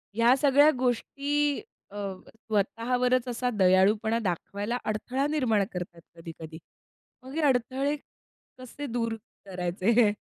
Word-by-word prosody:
ह्या 235 +3 +5
सगळ्या 285 +1 +6
गोष्टी 280 - 0 0.3
अ, 205 - -12 0.3
स्वतःवरच 235 +3 0
असा 245 +1 -1
दयाळूपणा 205 +5 +4
दाखवायला 205 +3 -3
अडथळा 250 +6 -1
निर्माण 245 -9 +2
करतात 175 -2 -6
कधी-कधी. 165 -1 -9 0.7
मग 260 +2 -10
हे 325 - 0
अडथळे 265 +3 +1 0.6
कसे 255 +3 -8
दूर 230 -1 -2 0.3
करायचे? 195 +5 +2
230 Hz, 105 wpm, -27 LUFS, 200-255 Hz, 0.7 s, सगळ्या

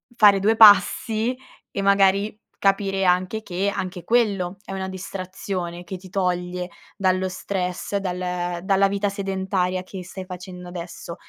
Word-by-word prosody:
fare 205 -3 +6
due 215 +3 +3
passi 220 +2 +6 0.4
e 200 - -3
magari 200 +1 +3 0.2
capire 195 -1 +1
anche 185 +4 +1
che 190 +1 -1
anche 180 -1 -4
quello 200 -6 +1
è - - -9
una 190 0 -3
distrazione 185 -2 -5
che 185 +2 -6
ti 185 +1 -13
toglie 180 -1 -1 0.3
dallo 185 -1 +1
stress, 185 0 -3
dal 180 -2 -3
dalla 195 0 +3
vita 200 +1 0
sedentaria 190 -2 -1
che 185 0 -8
stai 185 +1 -7
facendo 180 0 -9
adesso. 170 -1 -7
190 Hz, 140 wpm, -23 LUFS, 180-200 Hz, 0.4 s, fare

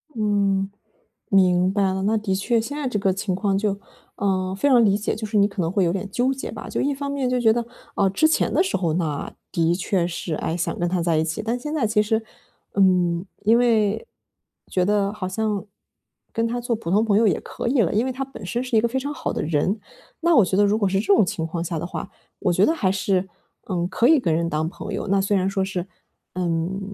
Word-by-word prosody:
嗯， 200 -3 +1 0.6
明 185 -1 +4
白 200 -1 +2
了。 190 0 -2
那 215 +3 +2
的 210 -3 -1
确 230 +4 +1
现 285 +6 -5
在 290 -3 -2
这 245 - -1
个 195 -1 +2
情 190 0 -2
况 195 0 0
就 200 -1 -1 0.4
嗯， 190 -1 -1
非 200 - +1
常 245 -3 +6
理 200 -2 +3
解， 210 - -2
就 220 - -5
是 215 0 0
你 200 0 +5
可 195 -2 -4
能 165 0 -1
会 195 0 +2
有 170 -1 +1
点 195 +1 -4
纠 250 +5 +1
结 265 - -6
吧。 - - -8
就 - - -1
一 285 - +1
方 280 0 -4
面 275 -3 -1
就 250 0 +1
觉 225 -2 +4
得， 235 0 -1 0.3
嗯， 195 -1 +2
之 315 - +4
前 315 - +1
的 340 - +4
时 385 - -1
候 170 -4 0
呢， 155 -4 -2 0.2
的 170 0 +2
确 180 -1 0
是， 170 -1 -4
诶， 165 +2 -2
想 170 - -2
跟 175 0 0
他 180 0 0
在 165 -2 +2
一 155 - +2
起， 165 +5 -3
但 230 +3 -1
现 295 +4 -5
在 280 -7 +1
其 210 0 +3
实， 220 +1 0 0.5
嗯， 180 -3 +3 0.2
因 225 +3 +5
为， 220 -3 +2 0.6
觉 180 - +2
得 205 0 +1
好 205 -3 -4
像 210 +1 -1 0.7
跟 230 0 0
他 240 +1 -2
做 235 -1 -1
普 215 -6 -6
通 210 +4 +3
朋 205 -2 +3
友 225 - +4
也 185 - +2
可 - - -6
以 250 0 +3
了， 180 - +1
因 220 +4 +2
为 - - -1
他 270 +2 -4
本 270 - -11
身 235 +8 -2
是 250 -2 -2
一 - - +5
个 235 - +2
非 260 +3 -1
常 285 +3 -4
好 - - -3
的 - - -2
人。 165 +7 0 0.4
那 340 0 +4
我 230 - +7
觉 185 - -1
得 205 - +5
如 205 +1 +2
果 200 -3 +2
是 195 +1 +1
这 210 - -4
种 220 - +5
情 160 -2 -3
况 165 +1 -3
下 170 -1 -3
的 170 - -4
话， 180 - -6 0.3
我 190 - +1
觉 185 +4 +4
得 320 - +2
还 200 - +1
是， 190 -1 0 0.4
嗯， 175 -2 0
可 230 +6 +2
以 310 +1 +6
跟 170 -10 0
人 170 +1 0
当 155 0 -1
朋 - - -7
友。 - - -3
那 195 0 +2
虽 200 +1 +1
然 185 0 +1
说 195 -1 0
是， 185 -2 -3 0.5
嗯， 175 +1 -1
200 Hz, 275 characters per minute, -23 LUFS, 185-230 Hz, 0.7 s, 我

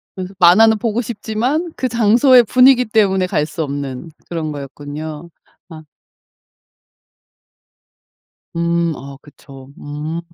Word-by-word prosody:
그래서 185 0 -7
만화는 215 +6 +5
보고 230 0 -1
싶지만 240 - -3
그 255 - -2
장소의 240 +3 +4
분위기 250 +2 +4
때문에 195 -4 +1
갈 150 -4 -1
수 160 +1 -6
없는 140 +1 -6 0.2
그런 160 -3 -4
거였군요. 150 +3 -8 0.4
아. 160 -2 -11 2.7
음 170 0 0
아 140 +1 -10
그쵸. 135 -2 -15
음. 150 +3 -6
170 Hz, 215 characters per minute, -17 LUFS, 150-225 Hz, 2.7 s, 만화는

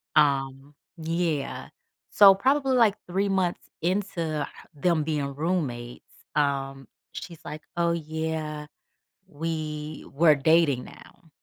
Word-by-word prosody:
Um, 140 -1 +2 0.2
yeah. 165 -3 -2 0.4
So 200 -2 +9
probably, 265 +6 +2
like, 220 -4 +5
3 195 +3 0
months 190 -3 -1
into 170 -4 -1 0.3
them 160 +1 +1
being 145 -3 -2
roommates, 140 -7 -2 0.3
um, 135 -2 -1 0.2
she's, 160 +3 -9
like, 155 +1 -7
"Oh, 170 -1 +2
yeah. 160 -2 -3 0.6
We 155 -2 -4
we're 155 +1 +5
dating 145 -3 +3
now." 165 - -16
160 Hz, 105 wpm, -26 LUFS, 145-175 Hz, 0.6 s, So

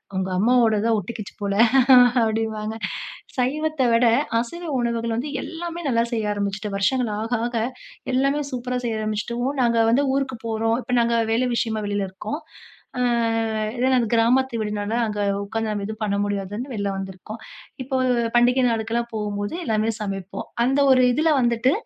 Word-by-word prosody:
உங்கள் 190 0 -1
அம்மாவோடது 225 -1 +3
தான் 225 - +3
ஒட்டுகிச்சு 215 +1 -7
போல, 200 -1 -1 0.7
அப்படிம்பாங்க. 220 -1 -2 0.6
சைவத்த 300 +3 0
விட, 235 +1 +4 0.3
அசைவ 335 +9 -6
உணவுகள் 230 -1 -1
வந்து 280 +5 -3
எல்லாமே 345 0 -6
நல்லா 230 -3 +2
செய்ய 215 -2 0
ஆரம்பிச்சுட்டேன். 200 0 -3
வருஷங்கள் 235 +2 +1
ஆக, 225 +2 -4 0.2
ஆக 240 - -5 0.6
எல்லாமே 275 +3 +2
சூப்பரா 250 0 -2
செய்ய 220 -1 -2
ஆரம்பிச்சுட்டவும் 235 +6 -2
நாங்க 235 -1 +2
வந்து 275 +4 +3
ஊருக்கு 265 -3 -1
போறோம். 225 +1 0
இப்ப 250 +1 -2
நாங்க 235 0 +1 0.2
வேலை 250 +3 +1
விஷயமா 220 -2 -1
வெளில 205 -1 -1
இருக்கோம். 215 - -5 0.6
அ, - - -1 0.8
இது 250 +2 +1
நாங்க 245 -3 +2
கிராமத்து 245 +2 +3
வீடுனால, 210 0 -3
அங்க 210 -1 -4 0.3
உட்காந்து 225 +2 -3
நம்ம 205 -1 -3
எதுவும் 220 0 -6
பண்ண 200 -1 0
முடியாதுன்னு 205 +5 -4
வெளில 200 -1 -1
வந்துருக்கோம். 195 +3 -7 0.4
இப்போ 265 +1 -2 0.4
பண்டிகை 250 +2 +4
நாளுக்கெல்லாம் 230 +1 -1
போகும்போது, 205 0 -3
எல்லாமே 220 -3 +1
சமைப்போம். 195 -2 -5 0.2
அந்த 270 +3 +1
ஒரு 255 -1 +6
இதுல 315 +5 +2
வந்துட்டு, 240 +2 +2
230 Hz, 150 wpm, -23 LUFS, 210-250 Hz, 0.8 s, ஒரு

